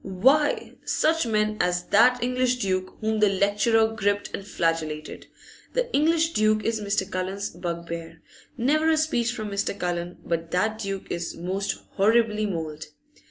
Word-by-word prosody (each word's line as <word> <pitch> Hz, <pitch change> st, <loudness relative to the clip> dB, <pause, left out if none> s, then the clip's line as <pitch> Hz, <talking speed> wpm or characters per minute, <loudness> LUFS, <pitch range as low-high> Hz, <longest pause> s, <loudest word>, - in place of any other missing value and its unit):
Why, 265 Hz, +11 st, +2 dB
such 320 Hz, -4 st, +1 dB
men 215 Hz, -1 st, +1 dB
as 180 Hz, 0 st, +1 dB
that 245 Hz, +4 st, +5 dB
English 250 Hz, 0 st, +1 dB
duke 185 Hz, -5 st, -2 dB
whom 220 Hz, 0 st, 0 dB
the 210 Hz, -1 st, +5 dB
lecturer 210 Hz, +3 st, +2 dB
gripped 205 Hz, -1 st, -1 dB
and -, -, -4 dB
flagellated. 165 Hz, -5 st, -2 dB, 0.5 s
The -, -, -1 dB
English 325 Hz, +2 st, +3 dB
duke 215 Hz, 0 st, +2 dB
is 225 Hz, -1 st, 0 dB
Mr. 200 Hz, 0 st, 0 dB
Cullen's 190 Hz, +2 st, -3 dB
bugbear; 170 Hz, -1 st, -6 dB, 0.3 s
never 305 Hz, +6 st, +2 dB
a 320 Hz, -, +3 dB
speech 245 Hz, -7 st, +1 dB
from 215 Hz, -3 st, -5 dB
Mr. 200 Hz, 0 st, -1 dB
Cullen 175 Hz, -1 st, -3 dB
but 165 Hz, -1 st, -2 dB
that 215 Hz, +6 st, 0 dB
duke 195 Hz, -2 st, -4 dB
is 170 Hz, -1 st, -3 dB
most 190 Hz, +4 st, -3 dB
horribly 215 Hz, +1 st, +3 dB
mauled. 160 Hz, -4 st, -5 dB
205 Hz, 150 wpm, -25 LUFS, 180-235 Hz, 0.5 s, that